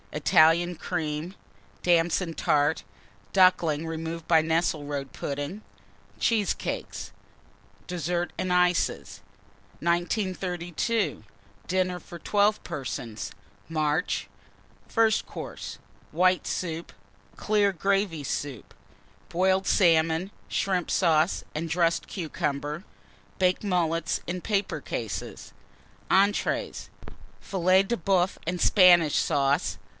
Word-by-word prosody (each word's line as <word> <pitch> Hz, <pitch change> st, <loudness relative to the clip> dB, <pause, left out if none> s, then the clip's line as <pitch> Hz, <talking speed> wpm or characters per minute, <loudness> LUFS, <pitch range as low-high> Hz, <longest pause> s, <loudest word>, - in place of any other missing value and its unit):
Italian 165 Hz, +2 st, +4 dB
Cream. 160 Hz, +1 st, -3 dB, 0.5 s
Damson 175 Hz, 0 st, +2 dB
Tart. 150 Hz, 0 st, +1 dB, 0.5 s
Ducklings, 180 Hz, -5 st, +4 dB
Cheesecakes. -, -, -5 dB
removed 165 Hz, 0 st, -5 dB
by 160 Hz, -2 st, +5 dB
Nesselrode 150 Hz, -4 st, -1 dB
Pudding. 145 Hz, +8 st, -4 dB, 0.6 s
DESSERT 180 Hz, -, -3 dB
AND 185 Hz, -, -2 dB
ICES. 180 Hz, -, +1 dB, 0.6 s
1932. 180 Hz, -, -1 dB, 0.4 s
DINNER 185 Hz, 0 st, 0 dB
FOR 170 Hz, -, -10 dB
12 205 Hz, +4 st, +2 dB
PERSONS 120 Hz, -5 st, -5 dB, 0.4 s
(March). 155 Hz, +1 st, 0 dB, 0.6 s
FIRST 225 Hz, -2 st, +2 dB
COURSE. -, -, -7 dB, 0.3 s
White 185 Hz, +2 st, +2 dB
Soup. 165 Hz, -2 st, -3 dB, 0.5 s
Clear 205 Hz, -2 st, +2 dB
Gravy 195 Hz, -3 st, 0 dB
Soup. 140 Hz, -2 st, -4 dB, 0.6 s
Boiled 190 Hz, +2 st, +2 dB
Salmon, 165 Hz, 0 st, +3 dB, 0.2 s
Shrimp 185 Hz, -3 st, 0 dB
Sauce, 165 Hz, -1 st, +2 dB
and 165 Hz, +2 st, -3 dB
dressed 170 Hz, 0 st, +1 dB
Cucumber. 150 Hz, -2 st, -3 dB, 0.5 s
Baked 185 Hz, +1 st, +2 dB
Mullets 170 Hz, -4 st, 0 dB
in 180 Hz, +1 st, -3 dB
paper 205 Hz, 0 st, -1 dB
cases. -, -, -5 dB, 0.6 s
ENTREES. 200 Hz, +2 st, +1 dB, 0.5 s
Filet 185 Hz, 0 st, +3 dB
de 235 Hz, +5 st, -1 dB
Boeuf 185 Hz, -1 st, +1 dB
and 180 Hz, +1 st, -1 dB
Spanish 175 Hz, -7 st, +6 dB
Sauce. 140 Hz, 0 st, +1 dB
175 Hz, 90 wpm, -27 LUFS, 160-185 Hz, 0.6 s, Spanish